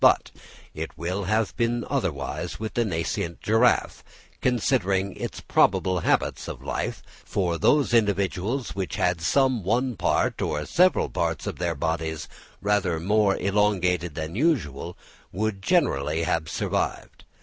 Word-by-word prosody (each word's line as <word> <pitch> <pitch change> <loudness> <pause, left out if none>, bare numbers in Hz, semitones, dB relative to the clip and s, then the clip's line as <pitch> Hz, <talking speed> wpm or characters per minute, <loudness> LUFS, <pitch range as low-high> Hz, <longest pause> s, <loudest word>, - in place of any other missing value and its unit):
But - - +5 0.4
it - - -6
will 90 +4 -2
have 110 +2 0
been 120 0 0
otherwise - - -3
with 110 0 -4
the 120 - +2
nascent 85 -3 -2
giraffe, 110 +3 +2 0.4
considering 100 -6 +1
its - - -5
probable 90 -1 +2
habits - - 0
of - - -7
life; - - -3 0.2
for 85 -4 -1
those 145 - +3
individuals 105 +3 +1
which 95 -2 -3
had 90 -2 +1
some 130 +5 +2
one 120 +6 +1
part 90 -1 0
or 75 0 -1
several 180 - +3
parts 85 -2 -2
of - - -5
their 85 -2 -1
bodies 80 +1 -2 0.4
rather 100 -5 +1
more 100 +3 +2
elongated 90 -5 +1
than 80 +1 -4
usual, 95 - 0 0.3
would 105 +1 -2
generally 80 - +1
have 80 -1 -1
survived. - - -2
95 Hz, 135 wpm, -25 LUFS, 85-110 Hz, 0.4 s, But